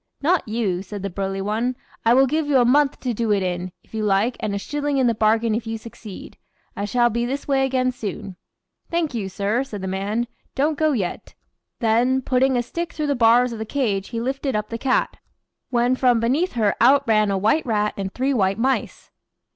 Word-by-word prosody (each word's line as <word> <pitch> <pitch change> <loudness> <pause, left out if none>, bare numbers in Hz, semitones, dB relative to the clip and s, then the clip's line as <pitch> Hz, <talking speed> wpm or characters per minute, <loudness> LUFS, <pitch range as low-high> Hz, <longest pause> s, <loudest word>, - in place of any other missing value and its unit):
"Not 345 -1 +2
you," 215 -5 -1
said 200 0 -7
the 200 - -3
burly 195 +1 -3
one. 225 +5 -1 0.3
"I 230 +1 +5
will 265 +1 +6
give 305 +3 -1
you 285 -2 +3
a 245 - +4
month 280 +3 +3
to 250 -2 -1
do 225 0 -1
it 200 -2 +2
in, 180 0 -3
if - - -29
you 220 -1 -2
like, 210 +4 +2
and 205 -1 -2
a - - 0
shilling 290 +6 -2
in 260 - +3
the 235 - +3
bargain 220 +1 +2
if 225 +1 -2
you 225 0 -3
succeed. 220 -2 -11 0.4
I 200 - -2
shall 240 +3 +2
be 235 +2 -1
this 270 +4 -3
way 270 -1 +2
again 255 -1 +1
soon." 200 -5 -6 0.5
"Thank 335 -4 -1
you, 205 -5 -3
sir," 205 +6 -1
said 210 -7 -7
the - - -2
man. 200 +5 -1 0.3
"Don't 300 +3 +1
go 310 0 +2
yet," 195 -8 -4 0.5
then, 245 +4 +2
putting 260 +1 +2
a 240 - +1
stick 335 +8 -5
through 305 - -2
the - - -3
bars 240 +1 +4
of 225 - -7
the - - -2
cage 215 -5 -1
he 230 - -3
lifted 265 +2 -2
up 210 0 -2
the 230 - -5
cat, 260 0 0 0.5
when 245 +1 +2
from 250 -2 +3
beneath 270 +11 +1
her 220 -4 +2
out 275 +3 +5
ran 215 -2 +3
a 195 - +1
white 220 +10 +1
rat 210 -2 +1
and 195 -1 -4
three 265 +5 0
white 195 -4 +1
mice. 260 +3 -1
235 Hz, 220 wpm, -22 LUFS, 210-265 Hz, 0.5 s, will